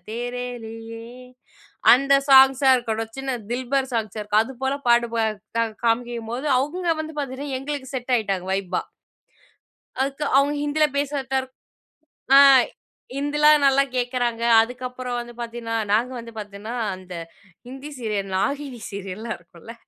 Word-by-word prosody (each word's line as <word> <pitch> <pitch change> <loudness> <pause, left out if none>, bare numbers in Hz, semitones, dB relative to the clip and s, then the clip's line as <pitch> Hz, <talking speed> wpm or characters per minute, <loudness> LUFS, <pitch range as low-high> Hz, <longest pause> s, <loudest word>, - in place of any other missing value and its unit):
தேரேலியே 230 -1 -6 0.9
அந்த 275 +2 +4
சாங்ஸ்ஸா 265 0 +7
இருக்கட்டும், 225 -2 -3
சின்ன 270 -1 -2
தில்பர் 260 +2 -1
சாங்ஸ் 220 -2 -2
இருக்கும், 210 +1 +2
அது 245 - -8
போல 265 +1 +1
பாடு 235 0 +4
ப - - 0 0.7
காமிக்கும்போது, 235 +2 -1
அவுங்க 330 +7 -2
வந்து 315 0 -5
பாத்தீங்கன்னா, 275 0 -4
எங்களுக்கு 275 0 -5
செட் 255 0 -3
ஆயிட்டாங்க 195 -5 -2
ஃவைபா. 190 -2 -1 1.2
அதுக்கு 275 +2 -2
அவங்க 285 +1 +3
ஹிந்தில 300 +1 +2
பேசுறதரு 270 -2 -2 0.9
ஆ - - +10 0.8
ஹிந்திலா 295 +2 +3
நல்லா 275 0 +5
கேட்கறாங்க. 245 -2 -1 0.2
அதுக்கப்புறம் 250 +1 -5
வந்து 240 0 -8
பார்த்திங்கன்னா, 230 -1 -5 0.2
நாங்க 235 +4 +2
வந்து 230 0 -11
பார்த்தீங்கன்னா, 205 +1 -7 0.2
அந்த 185 -1 -11 0.5
ஹிந்தி 270 +3 -8
சீரியல் 210 -4 -2
நாகினி 275 +3 -2
சீரியல்லாம் 200 +3 -5
இருக்கும்ல, 175 +5 -13
245 Hz, 120 wpm, -23 LUFS, 225-270 Hz, 1.2 s, ஆ